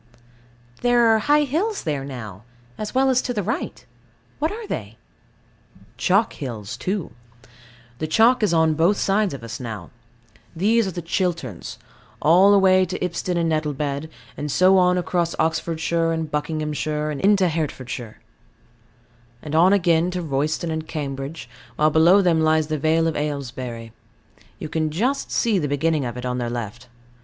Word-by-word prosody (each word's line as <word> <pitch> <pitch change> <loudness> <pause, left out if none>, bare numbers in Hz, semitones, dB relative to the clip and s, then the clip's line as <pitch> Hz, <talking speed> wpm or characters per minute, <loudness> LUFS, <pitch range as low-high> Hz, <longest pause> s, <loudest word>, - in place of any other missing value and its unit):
There 245 -1 +4
are 220 - +3
high 295 +6 +3
hills 355 - -1
there 145 -5 -2
now, 110 -8 -8 0.3
as 215 +3 -6
well 265 0 +4
as 255 0 +3
to 245 - -4
the 205 - -1
right. 230 - -4 0.5
What 315 +2 0
are 445 +2 -6
they? - - -6 1.0
Chalk 200 +4 +2
hills 115 -7 -6
too. 190 -2 -3 0.9
The 155 - -2
chalk 230 +9 +4
is 210 - +2
on 160 -1 +3
both 170 +6 +2
sides 200 0 +1
of 125 - -10
us 115 - -6
now. 110 -9 -7 0.6
These 215 +5 +2
are - - -3
the 175 -1 -6
Chilterns, 165 - -3 0.4
all 180 +6 +5
away 185 -1 +5
to 185 0 -3
Ipsden 180 0 -2
and 165 -1 +1
Nettlebed, 150 -1 -2 0.3
and 145 0 -4
so 185 +5 +5
on 180 0 +3
across 175 -1 -1
Oxfordshire 165 +1 0
and 160 -2 -3
Buckinghamshire, 150 0 -2
and 145 - -5
into 195 -1 +4
Hertfordshire; 130 -8 -4 1.3
and 150 - -6
on 170 +4 +5
again 175 -3 +3
to 180 -1 -3
Royston 155 +3 -1
and 160 0 -4
Cambridge, 140 -1 -5 0.3
while 155 +3 +3
below 170 +6 +5
them 165 -3 +3
lies 155 0 +3
the 155 -1 -1
Vale 160 +2 +2
of 160 - -1
Aylesbury; 125 -6 -4 0.6
you - - -6
can 155 0 -1
just 240 - -1
see 220 -5 +1
the 150 - -1
beginning 145 0 0
of 120 0 -5
it 125 - -6
on 125 0 -2
their 120 -1 -2
left. 120 0 -6
160 Hz, 160 wpm, -22 LUFS, 145-190 Hz, 1.3 s, all